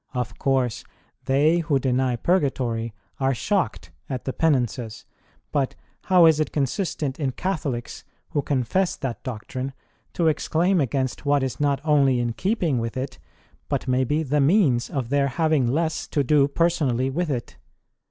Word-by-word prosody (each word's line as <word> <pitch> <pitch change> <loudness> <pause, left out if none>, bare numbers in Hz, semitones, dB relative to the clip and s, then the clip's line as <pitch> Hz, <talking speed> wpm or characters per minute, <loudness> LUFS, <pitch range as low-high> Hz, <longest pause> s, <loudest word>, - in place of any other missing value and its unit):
Of 125 -1 -3
course, 130 -4 0 0.4
they 145 +5 +3
who 155 -4 +1
deny 130 -1 +1
Purgatory 120 -7 0 0.3
are 135 -1 +1
shocked 200 - -1 0.2
at 130 -3 -4
the 130 - -2
Penances; 125 -7 0 0.5
but 140 -3 0 0.3
how 180 -2 +6
is 160 -2 +5
it 155 - 0
consistent 145 -1 -2
in 135 -4 -1
Catholics, 140 -10 -3 0.3
who 145 - +1
confess 140 +8 0
that 130 -4 -5
doctrine, 130 +3 -5 0.4
to 170 - +1
exclaim 170 +3 +2
against 130 +1 -2
what 145 -1 +3
is 130 - -3
not 145 -2 +1
only 140 -5 +3
in 120 -1 -1
keeping 175 - 0
with 115 +2 -3
it, 130 0 -4 0.5
but - - -2
may 130 0 +2
be 150 +5 0
the 145 0 +1
means 140 - +3
of 130 -4 -3
their 140 0 +2
having 155 -2 +1
less 160 +5 -1
to 145 - 0
do 140 0 +4
personally 140 -5 +1
with 170 +4 -1
it 125 -6 -4
140 Hz, 155 wpm, -24 LUFS, 130-155 Hz, 0.5 s, how